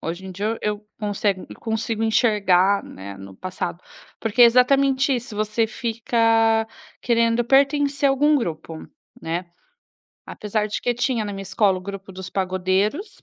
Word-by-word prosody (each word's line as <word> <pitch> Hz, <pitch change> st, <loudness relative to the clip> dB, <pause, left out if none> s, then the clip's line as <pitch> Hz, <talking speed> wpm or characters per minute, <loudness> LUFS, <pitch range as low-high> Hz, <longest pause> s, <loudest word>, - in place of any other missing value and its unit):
Hoje 175 Hz, +3 st, -5 dB
em 190 Hz, -, -7 dB
dia 200 Hz, +3 st, -3 dB, 0.2 s
eu 210 Hz, 0 st, 0 dB
eu 210 Hz, 0 st, -22 dB
consego 205 Hz, -2 st, -1 dB
eu -, -, -10 dB
consigo 225 Hz, 0 st, -2 dB
enxergar, 200 Hz, -4 st, +3 dB
né, 100 Hz, +1 st, -9 dB
no 95 Hz, 0 st, -11 dB
passado, 180 Hz, -1 st, -5 dB, 0.4 s
porque 225 Hz, +1 st, -1 dB
é -, -, +11 dB
exatamente 270 Hz, +3 st, +3 dB
isso, 240 Hz, -2 st, -5 dB
você 215 Hz, +1 st, 0 dB
fica 225 Hz, -1 st, +1 dB, 0.4 s
querendo 235 Hz, 0 st, +2 dB
pertencer 280 Hz, +2 st, +3 dB
a -, -, +3 dB
algum 295 Hz, +3 st, +3 dB
grupo, 165 Hz, -, -4 dB, 0.4 s
né? 170 Hz, 0 st, -3 dB, 0.8 s
Apesar 210 Hz, 0 st, -2 dB
de 210 Hz, -, -4 dB
que 245 Hz, -, 0 dB
tinha 245 Hz, -2 st, 0 dB
na 205 Hz, -, -4 dB
minha 195 Hz, 0 st, -6 dB
escola 190 Hz, 0 st, +1 dB
o -, -, -10 dB
grupo 195 Hz, 0 st, -8 dB
dos 185 Hz, 0 st, -8 dB
pagodeiros, 190 Hz, -, -1 dB
215 Hz, 160 wpm, -22 LUFS, 190-240 Hz, 0.8 s, é